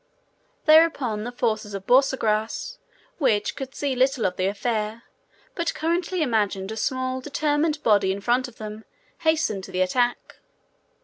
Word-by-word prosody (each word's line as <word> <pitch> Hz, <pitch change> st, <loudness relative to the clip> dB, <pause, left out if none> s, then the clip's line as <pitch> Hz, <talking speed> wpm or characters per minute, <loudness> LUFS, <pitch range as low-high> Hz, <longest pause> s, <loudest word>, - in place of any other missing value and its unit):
Thereupon 290 Hz, -9 st, +4 dB
the 245 Hz, -, -4 dB
forces 215 Hz, -4 st, -2 dB
of 195 Hz, -1 st, -6 dB
Borsagrass, 230 Hz, -4 st, +1 dB, 0.4 s
which 220 Hz, -8 st, +1 dB
could 270 Hz, -1 st, -7 dB
see 280 Hz, -2 st, -1 dB
little 260 Hz, -1 st, +2 dB
of 180 Hz, -, 0 dB
the 185 Hz, -, 0 dB
affair, 215 Hz, +2 st, -2 dB, 0.5 s
but 340 Hz, -2 st, -2 dB
correctly 340 Hz, +2 st, 0 dB
imagined 205 Hz, -6 st, 0 dB
a -, -, -4 dB
small 255 Hz, +3 st, -2 dB
determined 295 Hz, +2 st, 0 dB
body 200 Hz, -3 st, +3 dB
in 195 Hz, -, -3 dB
front 245 Hz, +5 st, +1 dB
of 245 Hz, -, -15 dB
them, 215 Hz, 0 st, -7 dB, 0.4 s
hastened 315 Hz, -12 st, +1 dB
to -, -, -11 dB
the 185 Hz, 0 st, -1 dB
attack. 240 Hz, +6 st, 0 dB
240 Hz, 145 wpm, -24 LUFS, 210-280 Hz, 0.5 s, Thereupon